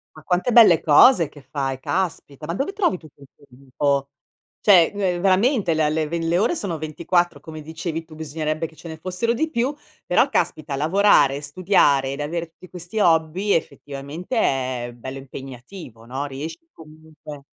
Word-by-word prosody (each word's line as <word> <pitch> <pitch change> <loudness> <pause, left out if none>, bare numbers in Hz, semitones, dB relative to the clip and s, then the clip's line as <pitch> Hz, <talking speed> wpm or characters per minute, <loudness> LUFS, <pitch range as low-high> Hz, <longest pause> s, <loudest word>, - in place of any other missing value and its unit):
Ma 155 - -14
quante 180 +8 0
belle 215 -9 +7
cose 165 - +6
che 145 - -15
fai, 135 0 -4
caspita, 160 -4 -3
ma 170 - -3
dove 290 - -2
trovi 375 - 0
tutto 155 -4 -18
il 140 - -14
tuo 145 - -22
tempo? 140 +2 -2 0.5
Cioè 185 -5 +6
ve 185 -3 -1
veramente 195 - +2
la 155 -1 +1
le 155 0 -1
ve 170 +2 -3
le 165 +1 0
ore 215 - +2
sono 190 - -3
24, 165 +1 -1
come 155 0 -9
dicevi 160 +1 -5
tu 160 -1 -15
bisognerebbe 155 +1 -3
che 160 - -19
ce 170 - -11
ne 160 -1 -8
fossero 185 +7 0
di 315 +7 -1
più; 265 0 -1 0.3
però - - +3
caspita 150 -3 -1
lavorare, 150 -4 +3
studiare 145 -4 +2
ed 140 - -6
avere 165 +3 -3
tutti 170 +2 -16
questi 180 +4 -6
hobby, 170 +3 +2
effettivamente 145 - -4
è 130 - -1
bello 130 +3 -8
impegnativo, 130 - -11
no. 135 +4 -4
Riesci 155 - -8
comunque 155 -2 -13
160 Hz, 170 wpm, -22 LUFS, 140-185 Hz, 0.5 s, belle